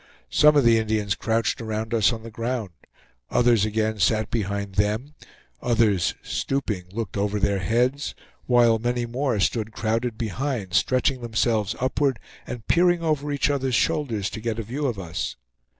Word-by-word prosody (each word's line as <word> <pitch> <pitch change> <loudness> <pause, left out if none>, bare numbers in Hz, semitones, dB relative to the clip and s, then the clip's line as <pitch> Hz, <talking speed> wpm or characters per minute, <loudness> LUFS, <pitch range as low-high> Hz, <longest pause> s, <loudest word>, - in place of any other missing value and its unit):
Some 150 0 +6
of 145 - +5
the 115 -1 +5
Indians 110 -2 0
crouched 115 +3 -1
around 110 +1 -3
us 110 -1 +4
on 115 -2 -6
the 115 - -9
ground; 115 -3 -3 0.6
others 120 -4 +3
again 110 0 -1
sat 110 +3 +2
behind 100 -3 -2
them; 105 +8 0 0.5
others, 105 -8 +2
stooping, 110 -10 -2
looked 105 -2 -4
over 105 +1 0
their 100 0 +1
heads; 125 +8 0 0.3
while 120 -2 +4
many 120 +1 -1
more 120 -1 -1
stood 110 +2 0
crowded 115 +1 -1
behind, 115 -3 -3
stretching 130 +6 +2
themselves 110 -2 0
upward, 130 0 +1 0.3
and 120 -3 -6
peering 175 0 +3
over 150 -2 0
each 145 0 +1
other's 135 -3 0
shoulders, 115 -4 0
to 110 - -6
get 115 -1 -2
a 115 - -3
view 135 +7 -2
of 120 -5 -2
us. 85 -3 -4
115 Hz, 160 wpm, -24 LUFS, 105-125 Hz, 0.6 s, Some